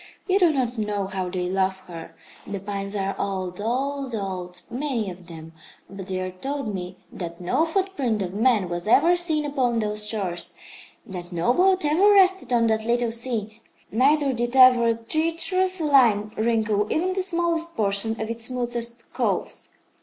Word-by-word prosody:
You 385 +1 +3
do 350 -4 +5
not 250 -5 -1
know 205 -2 -1
how 190 -1 -4
they 180 -1 -2
love 190 0 0
her. 165 -3 -10 0.3
The 200 -1 -4
pines 200 +1 -5
are 195 -1 -2
old, 190 -1 -3
old, 265 +3 -2
old, 180 -3 -5
many 245 -6 -2
of 180 0 -13
them, 165 -1 -11 0.3
but 195 0 -9
they 185 -1 -3
told 275 -5 -3
me 180 -1 -6
that 170 -2 -7
no 180 - +1
footprint 325 - -1
of 180 0 -5
man 220 -3 +2
was 175 +3 -4
ever 340 +10 +5
seen 320 -4 0
upon 260 -5 0
those 210 -1 +1
shores, 185 -6 -1 0.5
that 180 -1 -8
no 175 +8 +1
boat 370 +1 +3
ever 335 +8 +4
rested 380 -9 +4
on 235 -1 +3
that 220 -1 +1
little 235 0 0
sea, 230 -2 -3 0.3
neither 275 +4 +3
did 240 +1 -2
ever 255 -2 +7
a 230 - +2
treacherous 335 - 0
line 240 -9 +3
wrinkle 220 -2 0
even 365 +4 0
the 380 - 0
smallest 340 -2 -1
portion 210 +2 +1
of 220 - -3
its 230 0 -3
smoothest 240 -1 -5
coves. - - -2
230 Hz, 170 wpm, -24 LUFS, 195-285 Hz, 0.5 s, ever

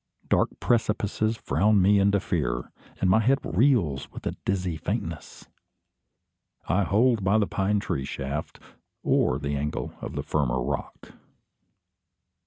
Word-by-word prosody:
Dark - - +1
precipices 110 -1 0
frown 105 +4 +2
me 100 +2 +5
into 100 +1 +3
fear, 75 -11 -2 0.3
and 95 - +1
my 95 +4 +5
head 130 +5 +3
reels 90 - +1
with - - -10
a - - 0
dizzy 90 -3 -1
faintness. 80 - -5 1.2
I 95 +2 +2
hold 110 +3 +2
by 95 +3 +3
the 105 - +3
pine 100 +2 0
tree 65 -8 -3
shaft, 70 +3 -5 0.4
or - - +2
the 70 0 -3
angle 75 +2 -3
of - - -6
the - - -2
firmer 65 -5 0
rock. - - -4
95 Hz, 135 wpm, -26 LUFS, 75-105 Hz, 1.2 s, me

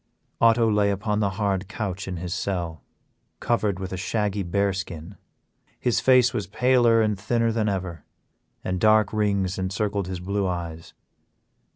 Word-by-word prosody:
Otto 115 0 +5
lay 105 -2 +2
upon 105 +1 -1
the 100 -2 +1
hard 100 -3 -1
couch 95 -3 -4
in 90 -2 -4
his 90 +1 -4
cell, 90 -5 -3 0.6
covered 105 -5 0
with 95 0 -5
a - - -3
shaggy 105 +1 -1
bear 100 +2 0
skin. 90 -1 -6 0.6
His 120 - +1
face 125 -3 +4
was 105 -5 -3
paler 120 +1 +3
and 105 -2 -1
thinner 115 +2 +1
than 110 -1 0
ever, 95 -5 -4 0.6
and 90 0 -2
dark 110 0 +4
rings 100 -3 0
encircled 100 +1 -2
his 95 -1 -4
blue 100 +2 -1
eyes. 85 -2 -5
100 Hz, 155 wpm, -24 LUFS, 95-110 Hz, 0.6 s, Otto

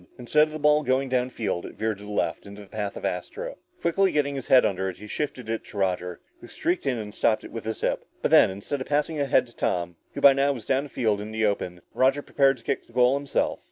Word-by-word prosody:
Instead 150 +5 +3
of - - -11
the 155 - -5
ball 150 0 +4
going 130 -1 +1
down 125 0 +1
field, 110 -8 -3
it - - -9
veered 110 -2 -2
to - - -11
the - - -9
left, 105 0 -2
in 100 - -10
the 105 0 -11
path 105 0 -4
of - - -6
Astro. - - -4 0.2
Quickly 190 +3 +2
getting 145 -1 +1
his 135 -2 -5
head 130 - +6
under 95 -1 0
it, 90 - -8
he 105 - -11
shifted 125 +1 -4
it 115 0 -2
to - - -11
Roger, 90 -2 -1 0.2
who 355 - -12
streaked 350 - -2
in 130 -3 +1
and 105 -2 -6
stopped 110 0 +1
it - - -10
with 115 - -6
his 110 0 -4
hip. - - 0 0.2
But - - +1
then, - - +7
instead 100 +9 -4
of - - -5
passing 150 +1 0
ahead 140 -2 +3
to 120 - -19
Tom, 85 -1 -1 0.2
who 140 - -4
by 140 -1 +9
now 140 +1 +2
was 120 -5 -8
down 135 +2 +1
field 110 -6 0
and 105 - -6
in 110 0 -6
the 110 - +3
open, 90 -4 -2
Roger 135 +2 +2
prepared 135 -1 +3
to 115 - -19
kick - - -1
for - - -30
the - - -21
goal 125 +1 +4
himself. 140 0 -1
125 Hz, 275 wpm, -26 LUFS, 105-140 Hz, 0.2 s, by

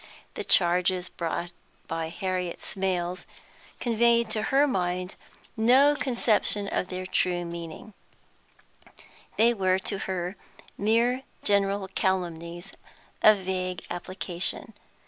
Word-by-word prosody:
The - - -4
charges 180 0 +3
brought 170 +1 -3 0.4
by 165 0 -3
Harriet 185 -1 -3
Smales 185 -2 -2 0.5
conveyed 235 -1 +3
to 215 - -1
her 280 +4 +3
mind 180 -5 -1 0.4
no 260 +6 +5
conception 225 -6 +1
of 185 - -1
their 185 0 -5
true 175 -1 0
meaning; 170 +4 -8 1.4
they 235 +2 +5
were 190 -3 +2
to 190 +1 -4
her 185 0 -3 0.4
mere 235 +5 +2 0.2
general 200 -1 +2
calumnies 175 -2 -2 0.5
of 210 -3 +5
vague 185 -1 -3
application. 185 +5 -1
190 Hz, 105 wpm, -27 LUFS, 180-215 Hz, 1.4 s, no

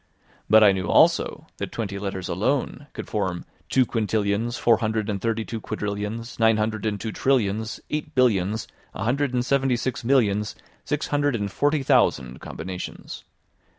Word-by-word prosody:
But 110 +1 +7
I 105 - +8
knew 95 -1 -2
also - - +3
that - - -4
twenty 100 -4 -4
letters 95 -2 -4
alone 130 +10 -1
could - - -6
form 95 -5 -2 0.2
two 130 -1 +4
quintillions, 110 +1 0
four 115 - +4
hundred 110 -1 -1
and 100 -2 -3
thirty 115 0 -1
two 115 -1 -5
quadrillions, 105 +4 -4
nine 115 -1 +4
hundred 110 0 -1
and 105 -1 -2
two 110 +3 -4
trillions, 110 -5 0
eight 150 0 -3
billions, 110 -3 +2 0.3
a 95 - -3
hundred 135 +4 +1
and 125 0 +1
seventy 135 -1 +2
six 125 +1 -3
millions, 105 -5 +2 0.3
six 145 0 -2
hundred 145 -2 +1
and 100 -3 -2
forty 145 +3 +1
thousand 65 - +2
combinations. 90 +2 -7
110 Hz, 160 wpm, -24 LUFS, 100-125 Hz, 0.3 s, I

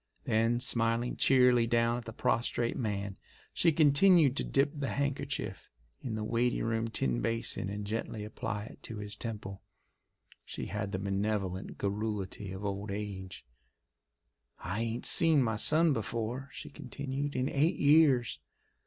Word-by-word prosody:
Then 115 +2 +2
smiling 120 -1 0
cheerily 125 -3 +4
down 115 +1 +2
at 120 - -11
the 115 - -6
prostrate 115 +1 0
man, 100 -4 -3 0.4
she 170 - +3
continued 155 -1 +5
to - - +1
dip 140 +1 +1
the 140 - -1
handkerchief, 140 -1 -3 0.3
in 115 -4 -4
the 110 - -3
waiting 120 +2 0
room 115 0 0
tin 65 - -1
washbasin 115 - -2
and 105 0 -4
gently 110 0 -3
apply 110 -1 -4
it - - -12
to 115 - -7
his 105 0 -6
temple. 105 -3 -6 0.8
She - - -6
had 100 +1 -4
the 95 - -2
benevolent 100 -1 -2
garrulity 100 -1 -3
of 95 +2 -6
old 100 +1 -3
age. 95 -6 -6 1.1
"I 100 +6 -3
ain't 115 +1 -3
seen 160 -5 +5
my 110 -3 0
son 155 +6 +4
before," 115 +3 -3
she - - -8
continued, 140 +2 -5
"in 130 +1 0
eight 150 +4 +2
years. 140 -5 +4
115 Hz, 145 wpm, -31 LUFS, 105-130 Hz, 1.1 s, continued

